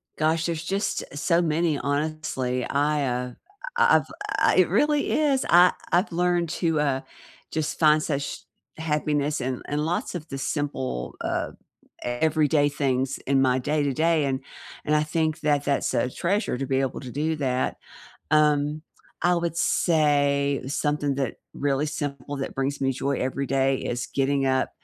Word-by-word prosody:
Gosh, 160 +1 +1
there's 165 -1 -3
just 195 +4 -1
so 170 +4 +2
many, 160 -1 +1
honestly. 140 -4 -2
I, 145 0 +1
uh, 125 0 -2 0.5
I 475 0 +5
I've - - -2 0.3
uh, - - +4
it - - +5
really 295 -1 +2
is. 285 -4 +2
I 175 +1 +7 0.2
I've 180 +4 +2
learned 175 0 +1
to, 165 -2 0
uh, 140 -3 +1 0.5
just 155 -1 -2
find 155 -1 +5
such 140 -3 -2 0.4
happiness 150 -1 0
in 130 0 -3
in 150 +1 -1
lots 175 +2 -2
of 165 -2 -6
the 135 - -4
simple, 130 - -3
um, - - -2 0.5
everyday 145 +3 +2
things 135 -2 -1
in 135 0 +1
my 130 0 +3
day-to-day, 150 +3 +1
and 135 -1 -1 0.5
and 150 - +2
I 150 - +3
think 160 +1 -1
that 145 -2 +1
that's 140 -1 0
a 125 - +1
treasure 190 - -1
to 135 - -2
be 135 0 +1
able 135 -2 -2
to 130 -2 -8
do 155 +5 -1
that. 130 -3 -1 0.5
Um, 150 0 +3 0.4
I 175 0 +4
would 170 -1 -1
say 145 -5 +2
something 145 0 0
that 135 -2 -2 0.2
really 140 +1 0
simple 145 -1 -4
that 135 - -4
brings 135 +1 -2
me 135 -1 +1
joy 135 +1 -1
every 135 +2 -2
day, 135 0 +2
is 120 0 -3
getting 135 0 0
up 130 0 +1
145 Hz, 160 wpm, -25 LUFS, 135-160 Hz, 0.5 s, I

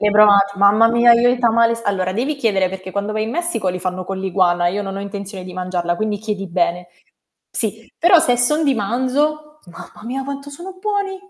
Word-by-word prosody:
Le 210 - +2
hai - - 0
provat 200 -1 +5
mamma 205 +3 +5
mia 235 +1 +5
io 235 +1 +4
ho 245 - +4
i 255 - -2
tamales. 230 -1 +2
Allora 185 -2 -1
devi 255 +9 -1
chiedere, 205 -9 0
perché 190 0 -8
quando 200 +2 -3
vai 215 0 -1
in 220 - -5
Messico 335 - -2
li 180 0 -2
fanno 185 0 -4
con 195 +1 -5
l'iguana, 180 -2 +1
io 200 +4 -1
non 195 -1 -6
ho - - -4
intenzione 200 -1 -7
di 185 - -9
mangiarla 180 -1 -2
quindi 210 +2 -2
chiedi 205 -2 -5
bene. 175 0 -1 0.6
Sì, - - -4
però 350 +1 +5
se 305 -7 +2
son 300 +6 +1
di 280 -2 +2
manzo, 285 +8 -2
mamma 175 +4 -13
mia 265 +3 -4
quanto 280 +1 -7
sono 360 +6 -10
buoni. 400 -1 -2
215 Hz, 220 wpm, -19 LUFS, 190-260 Hz, 0.6 s, provat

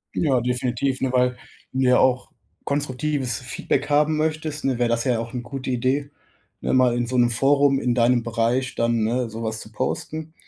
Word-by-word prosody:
Ja, 135 -6 +2
definitiv, 125 +2 -1
ne, 130 -1 0
weil 125 0 +2 0.4
du 130 - -2
ja 125 0 +5
auch 130 -1 +2 0.4
konstruktives 140 -3 -1
Feedback 135 +3 -2
haben 150 +1 +3
möchtest, 155 -1 -2
ne, 130 -2 0
wäre 120 -1 +1
das 115 0 +1
ja 125 -3 +1
auch 115 +1 -6
ne 125 - -3
gute 130 +2 -5
Idee, 130 +3 0 0.5
ne, - - -1
mal 125 -2 +4
in 120 0 -1
so 130 +2 -1
'nem 120 -1 +4
Forum 140 +3 +3
in 125 -2 0
deinem 120 0 +3
Bereich 115 +2 0
dann, 115 -1 +1
ne, 120 +2 0
sowas 110 0 -4
zu 110 - -11
posten 155 +7 -4
125 Hz, 190 wpm, -23 LUFS, 120-140 Hz, 0.5 s, ja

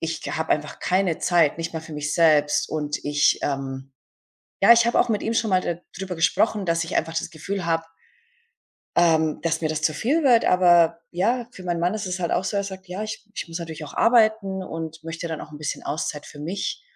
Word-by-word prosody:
ich 165 0 -3
habe 160 0 -3
einfach 150 0 -3
keine 185 -2 +1
Zeit, 170 -4 +2
nicht 165 0 -4
mal 160 - -3
für 160 0 -11
mich 150 0 -3
selbst. 150 -3 +3
Und 150 -1 -3
ich, 145 0 +2
ähm 135 -1 -4 0.7
ja, 200 - +9
ich 235 0 +4
habe 235 - +3
auch - - +1
mit 215 -3 0
ihm 225 - -1
schon 225 -1 +1
mal 185 -1 +4
da 170 - -2 0.2
drüber 190 -2 -5
gesprochen, 200 +5 +1
dass 165 0 +1
ich 165 - -3
einfach 165 +1 -3
das - - -5
Gefühl 185 +5 -5
habe 165 -1 0 1.1
ähm, 160 -2 +3
dass 165 -1 0
mir 160 - 0
das 155 0 -3
zu 155 0 +1
viel 290 - +1
wird. 240 -4 +5
Aber, 175 -2 +4
ja, 230 +7 0
für 185 - -11
meinen 175 -1 -1
Mann 175 +4 +1
ist 215 -2 -4
es 185 0 -3
halt 170 - -1
auch - - 0
so, 200 - -2
er 200 - 0
sagt: 190 -1 -8
„Ja, 185 +4 -4
ich 215 0 -6
ich - - -5
muss 165 +1 -5
natürlich 160 -2 -7
auch 145 - -10
arbeiten 220 -5 +3
und 160 -2 -7
möchte 165 +1 -5
ja - - -5
dann - - -9
auch 155 - -19
'n 150 - -9
bisschen 150 0 -4
Auszeit 150 -1 -4
für 150 - -12
mich.“ 190 - -4
170 Hz, 235 wpm, -24 LUFS, 155-195 Hz, 1.1 s, ja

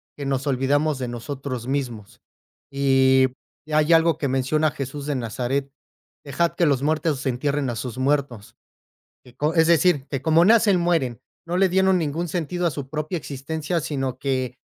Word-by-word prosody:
que 140 - -6
nos 135 0 -1
olvidamos 140 +2 +1
de 125 - -3
nosotros 125 0 -5
mismos 125 -7 -4 0.5
y 135 -1 +4 0.4
hay 155 +2 +3
algo 165 0 +4
que 140 - -1
menciona 135 +4 +1
Jesús 140 +1 -6
de 145 - -1
Nazaret: 130 +4 -2 0.5
"Dejad 160 +4 0
que 170 - +2
los 140 -1 +1
muertos 155 -2 0
entierren 140 +2 -1
a - - -5
sus 120 +1 -5
muertos". 130 -5 -1 0.7
Que 125 -1 -18
con 155 +4 -1
es 160 0 +5
decir, 165 -4 +3
que 135 -2 -3
como 165 +1 +4
nacen, 210 -4 +5
mueren, 160 -9 0 0.2
no 175 +2 -2
le 190 0 +4
dieron 190 +1 +3
ningún 165 +3 -2
sentido 175 +2 -2
a - - -1
su 140 -2 -6
propia 155 +3 -3
existencia, 155 +4 -3
sino 135 -4 -3
que 130 -2 -2
140 Hz, 165 wpm, -23 LUFS, 130-160 Hz, 0.7 s, es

